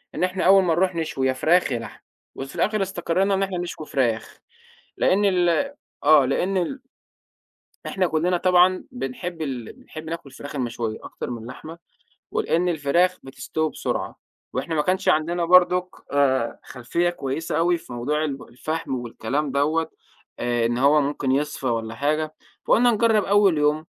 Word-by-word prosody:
إن -, -, -1 dB
إحنا 185 Hz, +1 st, 0 dB
أول 195 Hz, +1 st, +7 dB
ما 170 Hz, -3 st, +2 dB
نروح 180 Hz, +2 st, +1 dB
نشوي 155 Hz, -5 st, -1 dB
يا 130 Hz, -, +2 dB
فراخ 160 Hz, +5 st, +2 dB
يا 120 Hz, -, -1 dB
لحمة 115 Hz, -2 st, -10 dB, 0.3 s
وفي 135 Hz, +3 st, -7 dB
الآخِر 210 Hz, +5 st, +1 dB
استقرّينا 190 Hz, +1 st, 0 dB
إن 195 Hz, 0 st, +1 dB
إحنا 190 Hz, -2 st, -2 dB
نشوي 175 Hz, -3 st, -5 dB
فراخ، 120 Hz, -5 st, -1 dB, 0.6 s
لإن 200 Hz, +2 st, +2 dB
ال 180 Hz, -3 st, +3 dB, 0.6 s
آه، 150 Hz, -2 st, +7 dB
لإن 180 Hz, +8 st, 0 dB
ال 220 Hz, +10 st, -1 dB, 1.1 s
إحنا 185 Hz, -2 st, 0 dB
كلّنا 170 Hz, +3 st, +1 dB
طبعًا 180 Hz, +1 st, +4 dB
بنحب 135 Hz, +7 st, -5 dB
ال 130 Hz, -7 st, -4 dB
بنحب 155 Hz, -, -11 dB
ناكُل 165 Hz, -4 st, -6 dB
الفراخ 145 Hz, +2 st, -9 dB
المشوية 120 Hz, -4 st, -3 dB
أكتر -, -, -7 dB
من 120 Hz, -, -4 dB
اللحمة، 140 Hz, +8 st, -9 dB, 0.5 s
ولإن 180 Hz, +2 st, +1 dB
الفراخ 170 Hz, +4 st, +2 dB
بتستوي 155 Hz, +4 st, -3 dB
بسرعة، -, -, -4 dB, 0.3 s
وإحنا 150 Hz, +6 st, -2 dB
ما 150 Hz, -, +3 dB
كانش 185 Hz, +3 st, +1 dB
عندنا 170 Hz, +1 st, +1 dB
برضُك 180 Hz, +1 st, +5 dB, 0.2 s
آآ 130 Hz, -4 st, +1 dB
خلفية 155 Hz, +8 st, -1 dB
كويسة 150 Hz, -1 st, -3 dB
أوي 170 Hz, +1 st, +3 dB
في 125 Hz, -, -11 dB
موضوع 145 Hz, +6 st, -1 dB
ال 140 Hz, -3 st, -4 dB
الفحم 155 Hz, +3 st, -4 dB
والكلام 130 Hz, +4 st, -3 dB
دوّة 155 Hz, +4 st, +1 dB, 0.5 s
آآ 120 Hz, -1 st, 0 dB
إن 120 Hz, +1 st, 0 dB
هو 140 Hz, +4 st, +5 dB
ممكن 140 Hz, -1 st, -1 dB
يِصفى 140 Hz, 0 st, -1 dB
والّا 115 Hz, -1 st, -2 dB
حاجة، 155 Hz, +4 st, -1 dB, 0.3 s
فقُلنا 245 Hz, +1 st, +4 dB
نجرّب 220 Hz, -1 st, +3 dB
أول 200 Hz, -4 st, +4 dB
يوم 150 Hz, +1 st, +1 dB
155 Hz, 160 wpm, -23 LUFS, 135-180 Hz, 1.1 s, أول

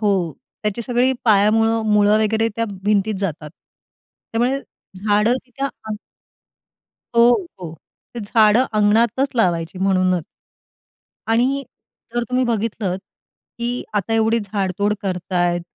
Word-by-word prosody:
हो, 195 Hz, -6 st, +1 dB, 0.3 s
त्याची 210 Hz, +2 st, -2 dB
सगळी 245 Hz, +2 st, +2 dB
पायामुळं, 225 Hz, +1 st, +3 dB
मुळं 210 Hz, +1 st, +4 dB
वगैरे 220 Hz, +1 st, +1 dB
त्या 230 Hz, -, +1 dB, 0.2 s
भिंतीत 210 Hz, +1 st, +1 dB
जातात. 155 Hz, -5 st, -4 dB
त्यामुळे 245 Hz, -, -5 dB, 0.4 s
झाडं 210 Hz, +3 st, +3 dB
तिथे 270 Hz, +2 st, -5 dB
आणि 220 Hz, -5 st, -5 dB, 1.2 s
हो, 235 Hz, +1 st, +7 dB, 0.3 s
हो. 165 Hz, -2 st, -7 dB, 0.4 s
ते 235 Hz, -, -4 dB
झाडं 215 Hz, +3 st, +4 dB
अंगणातच 230 Hz, +6 st, +3 dB
लावायची 175 Hz, -4 st, 0 dB
म्हणूनच. 185 Hz, -3 st, +1 dB, 1.0 s
आणि 255 Hz, +5 st, +2 dB, 0.5 s
जर 240 Hz, -, +1 dB
तुम्ही 255 Hz, 0 st, +1 dB
बघितलंत, 215 Hz, -5 st, -1 dB, 0.6 s
की 240 Hz, +1 st, -2 dB
आता 205 Hz, +2 st, -1 dB
एवढी 225 Hz, +1 st, +2 dB
झाडतोड 200 Hz, 0 st, -1 dB
करतायेत, 175 Hz, -2 st, -1 dB
215 Hz, 110 wpm, -20 LUFS, 195-235 Hz, 1.2 s, हो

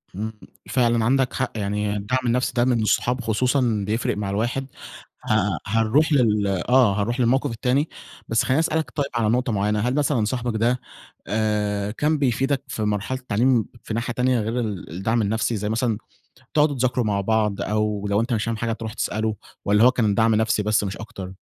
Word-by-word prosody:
إمم، 110 Hz, +2 st, -4 dB, 0.4 s
فعلًا 120 Hz, -3 st, +2 dB
عندك 130 Hz, 0 st, +2 dB
حق -, -, -1 dB
يعني 105 Hz, 0 st, -1 dB
الدعم 120 Hz, +6 st, -1 dB
النفسي 125 Hz, +1 st, +1 dB
ده 120 Hz, 0 st, +3 dB
من 120 Hz, -3 st, +2 dB
الصحاب 125 Hz, +3 st, +1 dB
خصوصًا 115 Hz, -1 st, +1 dB
بيفرِق 110 Hz, -1 st, -1 dB
مع 100 Hz, -2 st, -2 dB
الواحد، 120 Hz, +6 st, -1 dB, 0.6 s
ه 105 Hz, -5 st, +2 dB
هنروح 115 Hz, +9 st, +2 dB
لل 105 Hz, -6 st, +3 dB, 0.2 s
آه 120 Hz, -6 st, +4 dB
هنروح 120 Hz, +5 st, -2 dB
للموقف 130 Hz, +3 st, +2 dB
التاني، 130 Hz, +6 st, 0 dB, 0.4 s
بس 115 Hz, -, +2 dB
خلّيني 135 Hz, +4 st, +2 dB
أسألك 160 Hz, -1 st, 0 dB
طيب 145 Hz, -2 st, 0 dB
على 110 Hz, -2 st, +2 dB
نقطة 125 Hz, +1 st, +1 dB
معيّنة، 105 Hz, +1 st, +1 dB
هل 125 Hz, +5 st, 0 dB
مثلًا 140 Hz, -7 st, +1 dB
صاحبك 120 Hz, -1 st, -2 dB
ده 120 Hz, +3 st, +1 dB, 0.5 s
آآ، 105 Hz, -1 st, 0 dB
كان 150 Hz, +6 st, 0 dB
بيفيدك 135 Hz, 0 st, 0 dB
في 110 Hz, -, -4 dB
مرحلة 105 Hz, +5 st, -1 dB
التعليم 120 Hz, 0 st, +2 dB, 0.2 s
في 110 Hz, -, -5 dB
ناحية 115 Hz, +1 st, -2 dB
تانية؟ 125 Hz, 0 st, +1 dB
غير 115 Hz, +3 st, -2 dB
ال 105 Hz, -5 st, -4 dB
الدعم 110 Hz, +7 st, 0 dB
النفسي، 110 Hz, +2 st, 0 dB
زي 105 Hz, +1 st, -3 dB
مثلًا 115 Hz, -1 st, 0 dB, 0.6 s
تقعدوا 150 Hz, -1 st, +3 dB
تذاكروا 125 Hz, -1 st, 0 dB
مع 100 Hz, -1 st, 0 dB
بعض، 105 Hz, -1 st, 0 dB
أو 105 Hz, -1 st, -1 dB
لو 100 Hz, +2 st, +2 dB
أنت 120 Hz, +1 st, -1 dB
مش 110 Hz, -, 0 dB
فاهم 115 Hz, -1 st, -2 dB
حاجة 115 Hz, 0 st, -1 dB
تروح 110 Hz, -1 st, -6 dB
تسألُه، 110 Hz, 0 st, -1 dB, 0.3 s
والَّا 105 Hz, +2 st, +4 dB
هو 125 Hz, -, +7 dB
كان 110 Hz, -5 st, +1 dB
دعم 110 Hz, 0 st, +3 dB
نفسي 110 Hz, -1 st, +1 dB
بس 105 Hz, 0 st, +2 dB
مش 100 Hz, 0 st, -4 dB
أكتر؟ 110 Hz, -4 st, -8 dB
115 Hz, 190 wpm, -23 LUFS, 105-125 Hz, 0.6 s, هو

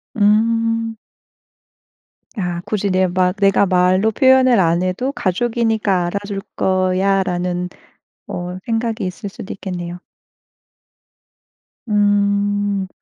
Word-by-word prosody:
음. 225 Hz, +1 st, +2 dB, 1.4 s
아 175 Hz, -3 st, -3 dB
굳이 205 Hz, -2 st, -1 dB
내 185 Hz, 0 st, +2 dB
막 180 Hz, +1 st, +1 dB
내가 195 Hz, -1 st, +3 dB
말로 185 Hz, +3 st, +3 dB
표현을 260 Hz, -2 st, +4 dB
안 170 Hz, 0 st, +2 dB
해도 185 Hz, +9 st, -1 dB
'가족이니까 220 Hz, -3 st, 0 dB
알아줄 200 Hz, +2 st, -4 dB
거야.'라는 185 Hz, -1 st, 0 dB, 0.6 s
어 180 Hz, +1 st, -5 dB
생각이 225 Hz, -2 st, -1 dB
있을 195 Hz, +3 st, -5 dB
수도 195 Hz, -1 st, -8 dB
있겠네요. 175 Hz, -2 st, -6 dB, 1.9 s
음. 205 Hz, -1 st, +1 dB
200 Hz, 190 characters per minute, -19 LUFS, 185-220 Hz, 1.9 s, 표현을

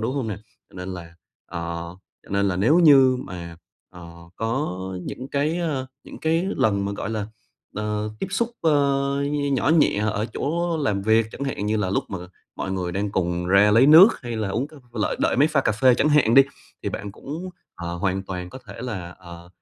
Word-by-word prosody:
đúng 120 Hz, +5 st, -2 dB
hông 130 Hz, -6 st, -2 dB
nè? 105 Hz, -, -3 dB, 0.3 s
Cho -, -, -22 dB
nên 90 Hz, 0 st, -6 dB
là 85 Hz, -1 st, -10 dB, 0.4 s
ờ, 85 Hz, -2 st, -4 dB, 0.6 s
cho -, -, -19 dB
nên 100 Hz, 0 st, +1 dB
là 90 Hz, -, -1 dB
nếu 145 Hz, -, +4 dB
như 135 Hz, -6 st, +6 dB
mà, 85 Hz, -2 st, -8 dB, 0.3 s
ờ, 90 Hz, -2 st, -11 dB, 0.3 s
có 115 Hz, -4 st, -2 dB, 0.2 s
những 130 Hz, +8 st, -7 dB
cái, 150 Hz, +4 st, 0 dB
ơ, 145 Hz, -6 st, -2 dB, 0.2 s
những -, -, -11 dB
cái 165 Hz, +3 st, +1 dB
lần 100 Hz, -2 st, +1 dB
mà, 100 Hz, -, -2 dB
gọi 100 Hz, +2 st, -4 dB
là, 105 Hz, -2 st, -3 dB, 0.5 s
ờ, 105 Hz, 0 st, -2 dB
tiếp -, -, -1 dB
xúc, 235 Hz, +3 st, 0 dB
ơ, 160 Hz, -, +2 dB, 0.5 s
nh 145 Hz, -1 st, 0 dB
nhỏ 135 Hz, -, +1 dB
nhẹ 160 Hz, -9 st, +4 dB
ở 105 Hz, +2 st, -2 dB
chỗ 170 Hz, +2 st, -1 dB
làm 105 Hz, -10 st, -1 dB
việc, 110 Hz, +1 st, +3 dB
chẳng 140 Hz, -, -5 dB
hạn 105 Hz, -6 st, -3 dB
như 110 Hz, +1 st, +1 dB
là 95 Hz, -3 st, -1 dB
lúc -, -, 0 dB
mà 95 Hz, -, -4 dB, 0.4 s
mọi 95 Hz, -, -3 dB
người 90 Hz, -2 st, -3 dB
đang 100 Hz, +2 st, -2 dB
cùng 90 Hz, -1 st, -1 dB
ra 100 Hz, +3 st, +5 dB
lấy 115 Hz, +6 st, +6 dB
nước, 165 Hz, +8 st, +10 dB
hay 120 Hz, -2 st, -4 dB
là 105 Hz, -3 st, -2 dB
uống 120 Hz, +8 st, -1 dB
c -, -, -25 dB, 0.2 s
lợi 110 Hz, -3 st, -1 dB
đợi -, -, +2 dB
máy 145 Hz, +4 st, +4 dB
pha 150 Hz, -3 st, +2 dB
cà 110 Hz, -, +1 dB
phê 125 Hz, +3 st, +4 dB
chẳng 150 Hz, -, +2 dB
hạn 140 Hz, -6 st, +4 dB
đi, 135 Hz, -, +9 dB, 0.4 s
thì -, -, -2 dB
bạn 100 Hz, -1 st, -6 dB
cũng, 160 Hz, +10 st, -7 dB, 0.3 s
ờ, 85 Hz, 0 st, -5 dB
hoàn 95 Hz, +1 st, -1 dB
toàn 90 Hz, -2 st, -6 dB
có 130 Hz, -, -9 dB
thể -, -, -10 dB
là, 95 Hz, -8 st, -5 dB
ờ, 85 Hz, -1 st, -12 dB
110 Hz, 215 wpm, -23 LUFS, 95-140 Hz, 0.6 s, nước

